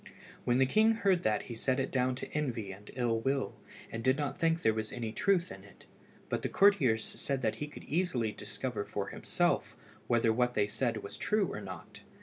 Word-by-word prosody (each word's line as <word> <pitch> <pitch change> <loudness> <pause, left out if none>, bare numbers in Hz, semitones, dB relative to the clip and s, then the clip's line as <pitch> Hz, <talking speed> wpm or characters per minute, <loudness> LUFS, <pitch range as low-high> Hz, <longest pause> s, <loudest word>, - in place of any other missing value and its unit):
When 120 0 +3
the 135 - +5
king 220 +11 +4
heard 195 -6 +2
that 105 -1 +1
he 120 - -7
set 130 +3 0
it 135 - -1
down 130 -1 +1
to - - -7
envy 120 -9 -2
and 100 +2 -11
ill 120 -3 +1
will, 135 +3 0 0.4
and 115 0 -4
did 130 +2 +3
not 145 -2 -2
think 165 0 +2
there 110 - +4
was 110 0 -3
any 115 -3 -4
truth 185 - +1
in - - -9
it, - - -17 0.4
but - - -1
the - - -2
courtiers 145 - +4
said 135 -2 -3
that 110 - 0
he 150 - -4
could 150 - -11
easily 140 -9 0
discover 110 0 -4
for - - -4
himself - - 0 0.3
whether 115 -1 +3
what 125 +1 +1
they 105 - +3
said 115 +1 -1
was 100 - -8
true 210 -4 +1
or - - -5
not. 95 -4 -9
125 Hz, 210 wpm, -32 LUFS, 110-150 Hz, 0.4 s, the